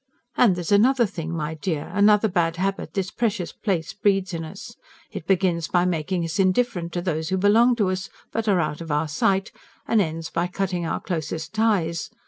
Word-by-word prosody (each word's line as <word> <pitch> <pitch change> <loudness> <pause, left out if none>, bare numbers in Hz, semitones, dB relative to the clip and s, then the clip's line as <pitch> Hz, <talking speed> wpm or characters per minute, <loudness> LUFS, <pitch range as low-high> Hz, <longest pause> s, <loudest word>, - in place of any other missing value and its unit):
And 220 -7 +4
there's 175 0 -4
another 240 +5 +5
thing, 165 -5 -5
my 160 -2 -3
dear 155 0 -3
another 210 +2 +5
bad 170 -4 0
habit 195 +2 -3
this 190 -2 -1
precious 210 -7 -1
place 175 -6 -2
breeds 195 -2 +1
in 165 -1 -3
us. 155 - -9 0.4
It 160 - -7
begins 180 -4 +1
by 175 0 +2
making 175 0 -1
us 165 +4 -4
indifferent 185 -2 +1
to 175 - -2
those 160 -3 -2
who 190 - 0
belong 225 +6 +4
to 205 -5 +1
us 185 0 -4 0.2
but 225 -1 -2
are 195 -3 +3
out 155 -1 -2
of 165 - -7
our 150 +2 +1
sight, 190 +7 0 0.4
and 225 -2 +3
ends 165 -2 -3
by 170 +1 0
cutting 180 -2 -2
our - - -2
closest 160 -1 -4
ties. 200 -7 +1
180 Hz, 195 wpm, -24 LUFS, 165-200 Hz, 0.4 s, another